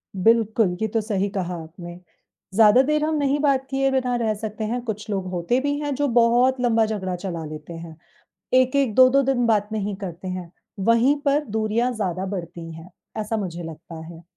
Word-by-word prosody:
बिल्कुल, 220 -1 +2
ये 220 - +1
तो 225 +1 -1
सही 205 -2 -1
कहा 180 -3 -3
आपने। 175 +2 -10 0.6
ज़्यादा 225 +3 +7
देर 300 +2 +1
हम 315 - 0
नहीं 285 0 +1
बात 275 -2 +2
किए 270 0 +1
बिना 255 -2 0
रह 225 -2 0
सकते 215 0 -5
हैं, 240 +3 -2
कुछ 215 0 -5
लोग 195 -3 -2
होते 180 +8 0
भी 285 0 0
हैं, 290 -1 -2
जो 290 +2 0
बहुत 245 +1 +3
लम्बा 225 -2 +3
झगड़ा 190 -4 -3
चला 175 -3 -5
लेते 155 +2 -8
हैं। 165 -1 -9 0.6
1-1 255 -2 +3
2-2 260 +2 +6
दिन 245 -2 +1
बात 210 -2 +2
नहीं 205 -2 -2
करते 175 +1 -7
हैं, 180 -2 -5 0.3
वहीं 230 +7 +4
पर 290 +2 +2
दूरियाँ 220 +2 0
ज़्यादा 190 -4 -2
बढ़ती 170 -3 -6
हैं, 165 +2 -11 0.3
ऐसा 215 +1 -2
मुझे 175 -4 -4
लगता 165 0 -9
है। 170 0 -11
215 Hz, 190 wpm, -23 LUFS, 180-250 Hz, 0.6 s, ज़्यादा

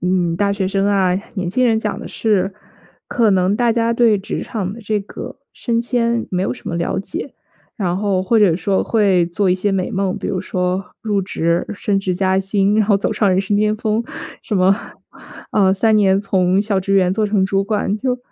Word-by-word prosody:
嗯， 180 -2 +1
大 200 +1 +1
学 200 -1 -1
生 195 +1 0
啊、 190 -3 +2 0.2
年 185 -4 -2
轻 255 +7 +1
人 225 -2 +3
讲 210 -2 -3
的 - - -8
是， 200 -3 0 0.6
可 230 -3 +2
能 190 0 +2
大 240 0 +2
家 230 0 +1
对 230 -3 +3
职 195 - -4
场 195 -4 -4
的 230 - -10
这 210 0 0
个 200 - -9 0.2
升 230 -2 -1
迁 235 -1 0
没 180 0 -1
有 - - -1
什 - - -9
么 170 - -3
了 170 +2 -1
解， 315 - -5 0.4
然 180 -6 -1
后 195 -1 0
或 225 +5 +1
者 185 -6 +4
说 190 +2 0
会 195 -6 +3
做 185 +3 0
一 - - +4
些 190 +2 0
美 190 +3 -1
梦， 190 -2 -1
比 - - -5
如 190 -3 -2
说 185 0 -2 0.2
入 205 -3 0
职、 170 -2 0
升 200 0 -1
职 190 -2 -1
加 190 +1 +1
薪， 195 +1 +1
然 215 - +4
后 205 - +5
走 200 - -1
上 205 -3 +2
人 185 +1 +2
生 200 +1 0
巅 215 +1 +1
峰， 215 +1 -1 0.4
什 210 - -2
么， 185 +1 +4 0.8
呃， 195 -2 +4
3 220 +2 +2
年 195 -2 +4
从 190 -1 +1
小 205 -2 0
职 195 +1 -1
员 185 -2 +3
做 215 +1 0
成 205 -2 +1
主 195 0 +1
管， 205 0 -1
就， 250 +3 -2
195 Hz, 230 characters per minute, -18 LUFS, 185-215 Hz, 0.8 s, 后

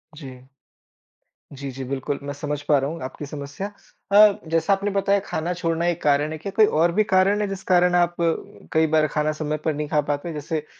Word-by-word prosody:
जी। 130 -3 -11 1.0
जी, 140 0 -6
जी, 135 +1 -7
बिल्कुल, 135 +2 -3
मैं 145 0 -4
समझ 145 0 -4
पा 145 -1 +3
रहा 135 +2 -2
हूँ 165 +1 -7
आपकी 135 +3 -6
समस्या। 145 +6 -6 0.4
अ, 205 0 +7
जैसा 165 +4 +2
आपने 200 +1 -1
बताया, 200 0 +2
खाना 170 +3 -2
छोड़ना 170 -1 -1
एक 175 -1 -1
कारण 145 +1 +2
है, 155 - -4
क्या 195 +6 -6
कोई 220 - +6
और 170 -1 +2
भी 215 +4 +2
कारण 195 +1 +2
है, 205 - 0
जिस 195 -1 -6
कारण 180 0 +4
आप 175 0 +2 0.6
कई 160 0 +3
बार 155 0 +3
खाना 150 +1 0
समय 155 0 -1
पर 160 - +1
नहीं 150 0 -3
खा 150 0 +2
पाते? 145 +3 -2
जैसे 150 +1 -4
160 Hz, 210 wpm, -23 LUFS, 145-180 Hz, 1.0 s, अ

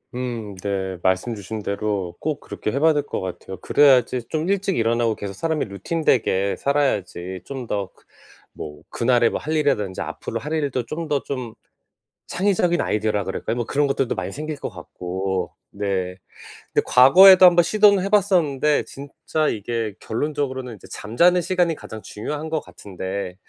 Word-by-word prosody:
음 120 -5 -4
네. 95 -2 -2
말씀 95 +5 +1
주신 105 +2 -6
대로 100 -3 -2
꼭 155 -2 -2
그렇게 105 - -5
해 140 - -1
봐야 160 +2 +5
될 145 -1 0
것 - - -4
같아요. 95 0 -6
그래야지 125 +2 +3
좀 155 +1 -2
일찍 195 -1 0
일어나고 115 0 +1
계속 100 -1 -6
사람이 160 - -1
루틴되게 100 - 0
살아야지 95 -10 -1
좀 130 -3 -6
더 100 -3 -2
그 - - -28 0.5
뭐 75 -1 -8
그날에 120 -1 +2
뭐 - - -3
할 155 - -4
일이라든지 135 -12 0
앞으로 - - -5
할 150 +2 -5
일도 140 -6 -1
좀 165 +1 -4
더 145 -2 0
좀 125 -5 -5 0.7
창의적인 180 -2 +1
아이디어라 105 -1 0
그럴까요? 110 - -3
뭐 120 -2 -2
그런 145 +3 +1
것들도 135 -2 0
많이 - - -4
생길 155 +1 -5
것 - - -5
같고 90 0 -4 0.2
네. 95 -3 -2 0.6
근데 - - +3
과거에도 185 +9 +8
한번 175 -1 +6
시도는 205 +1 +4
해 - - -1
봤었는데 170 -8 +2
진짜 145 +2 -3
이게 110 0 -3
결론적으로는 130 -1 -3
이제 - - -15
잠자는 170 +12 +2
시간이 175 -1 +1
가장 110 -7 -9
중요한 145 +11 -5
것 160 -1 0
같은데 95 -4 -6
125 Hz, 350 characters per minute, -22 LUFS, 100-155 Hz, 0.7 s, 과거에도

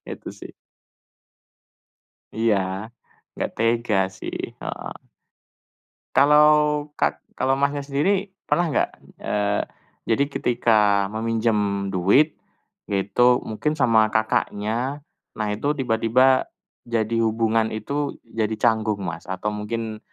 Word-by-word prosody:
Itu - - -8
sih. - - -10 1.8
Iya, 110 -2 +2 0.8
enggak - - -3
tega 115 -2 +1 0.2
sih - - -6 0.2
heeh. - - -6 1.2
Kalau 150 +2 +6 0.4
kak - - 0 0.2
kalau 135 +1 +1
Masnya, 140 0 0
sendiri 185 +8 0 0.2
pernah 175 -2 +1
enggak, - - +1 0.3
eee, 105 0 -1 0.4
jadi 115 +5 +2
ketika 105 -6 +2
meminjam 110 -3 0
duit, 100 - +3 0.5
itu 100 +4 +1 0.2
mungkin 150 +8 -2
sama 115 -6 +4
kakaknya, 110 +5 -1 0.3
nah 105 -1 -2
itu 140 +9 -1
tiba-tiba 130 +1 +3 0.4
jadi 115 -1 -1
hubungan 110 0 +1
itu 140 +7 -3
jadi 110 -1 -2
canggung 110 -1 +1
Mas, 85 -3 -5
atau 95 +3 -3
mungkin 110 +1 -4
115 Hz, 100 wpm, -23 LUFS, 105-135 Hz, 1.8 s, Kalau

